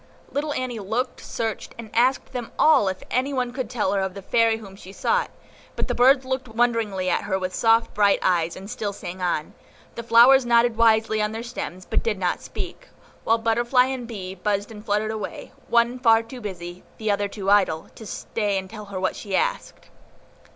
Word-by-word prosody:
Little 295 +2 -2
Annie 255 -4 -3
looked, 220 +6 -3
searched, 225 -2 -4
and 225 -2 -9
asked 255 +3 +2
them 245 -3 -5
all 310 -10 +5
if 190 0 -3
any 265 +3 0
one 250 -2 -1
could 255 -4 -4
tell 220 -6 0
her 195 - +1
of 190 0 -3
the 195 - -8
Fairy 225 +2 +3
whom 200 -3 -11
she 190 -1 -12
sought; 480 - 0 0.5
but - - -2
the - - -1
birds 260 +2 +5
looked 260 0 -3
wonderingly 225 -5 0
at - - 0
her 190 - 0
with 185 -1 -3
their - - -5
soft, 225 0 +3
bright 205 -1 +4
eyes, 170 -2 +1
and 190 +1 -9
still 205 -1 -4
sang 185 -1 -8
on; 175 -4 -1 0.4
the - - -5
flowers 240 +4 +6
nodded 235 -1 +3
wisely 220 -1 +3
on 210 +1 -1
their 225 +1 -5
stems, 185 -6 -6
but - - 0
did 220 -3 -1
not 180 -2 -1
speak, - - -7 0.4
while 225 - +4
butterfly 235 +3 +2
and 260 -2 -4
bee 190 -5 -6
buzzed 200 +2 -2
and 210 -1 -10
fluttered 215 0 0
away, 215 -2 -6 0.2
one 235 +1 +2
far 225 -2 +5
too 245 +2 -10
busy, 180 -3 -7
the 215 -1 0
other 205 0 0
too 200 -1 -2
idle, 185 -6 +3
to 220 - -11
stay 205 -2 -2
and 190 0 -5
tell 215 -2 -8
her 195 -2 -6
what 185 - -1
she 200 -2 -4
asked. - - -2
220 Hz, 205 wpm, -24 LUFS, 195-240 Hz, 0.5 s, flowers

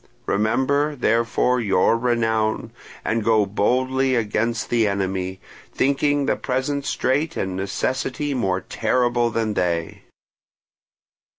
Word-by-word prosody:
Remember, 130 +8 +1
therefore, 115 +1 +1
your 100 0 +3
renown, 115 -2 0 0.3
and 115 0 0
go 110 -1 +3
boldly 130 +6 +1
against 115 0 -1
the 115 -2 +3
enemy, 95 -1 -2 0.3
thinking 140 +1 +1
the - - +1
present 135 +2 -2
strait 145 +2 0
and 95 -1 -2
necessity 130 +9 -2
more 95 -7 0
terrible 120 +2 +1
than 110 -2 -1
they." 85 -4 -2
115 Hz, 105 wpm, -22 LUFS, 105-130 Hz, 0.3 s, your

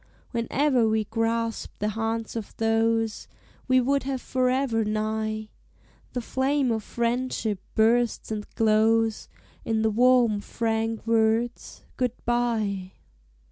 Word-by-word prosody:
Whene'er 245 0 +2
we 220 0 +1
grasp 225 +1 -2
the 210 - -1
hands 225 +1 -3
of 225 -3 -6
those 225 0 +1 0.4
We 255 -1 +5
would 275 +2 +2
have 265 -1 -3
forever 255 -2 +1
nigh, 215 0 -2 0.6
The 245 - -2
flame 265 +2 0
of 220 -1 -1
Friendship 235 -3 -1 0.2
bursts 230 +1 +2
and 210 -1 -4
glows 225 0 +2 0.3
In 220 -1 0
the 220 - +2
warm, 240 -2 +4
frank 225 +1 -2
words, 230 +1 0
"Good 250 -2 0
bye." 220 -6 0
225 Hz, 115 wpm, -26 LUFS, 220-245 Hz, 0.6 s, We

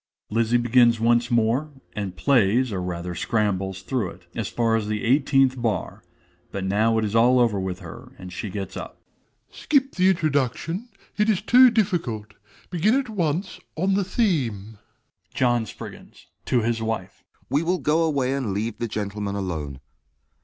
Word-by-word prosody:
(_Lizzie 115 +2 +2
begins 120 -1 +4
once 120 +1 +2
more, 120 +6 +1 0.3
and 100 -4 -4
plays 125 0 +2
or 95 -2 -2
rather 90 0 -4
scrambles 95 -1 -1
through 120 -7 -1
it, 90 +1 -14
as 110 -4 -3
far 115 0 +1
as 110 -2 -1
the 105 -1 -2
eighteenth 135 0 +3
bar; 110 -7 -2 0.5
but 100 - -4
now 110 +4 +2
it 110 - +1
is 105 +1 -3
all 120 +3 +5
over 115 -5 +2
with 95 -1 -4
her, - - -10
and 90 -1 -9
she 105 +3 -5
gets 95 -2 -5
up._) - - -7 0.6
DOMINIE. - - -13
Skip 275 -2 +2
the 185 +1 +3
introduction, 165 - -1 0.3
it 210 +1 +2
is 210 -2 +1
too 250 +3 +7
difficult: 170 - -1 0.4
begin 190 +7 +2
at 270 -3 -1
once 180 -2 -2 0.2
on 190 +4 +1
the 200 +1 +2
theme. 125 - -1 0.6
JOHN 120 -3 +2
S. - - -17 0.7
(to 125 - +2
his 115 0 0
wife). 110 -4 -4 0.3
We 145 - +3
will 180 +2 0
go 155 +1 +1
away 140 -5 +1
and 125 -8 -2
leave 110 +2 -3
the 120 - -1
gentlemen 105 -1 -4
alone. 80 -9 -4
120 Hz, 165 wpm, -24 LUFS, 105-155 Hz, 0.7 s, too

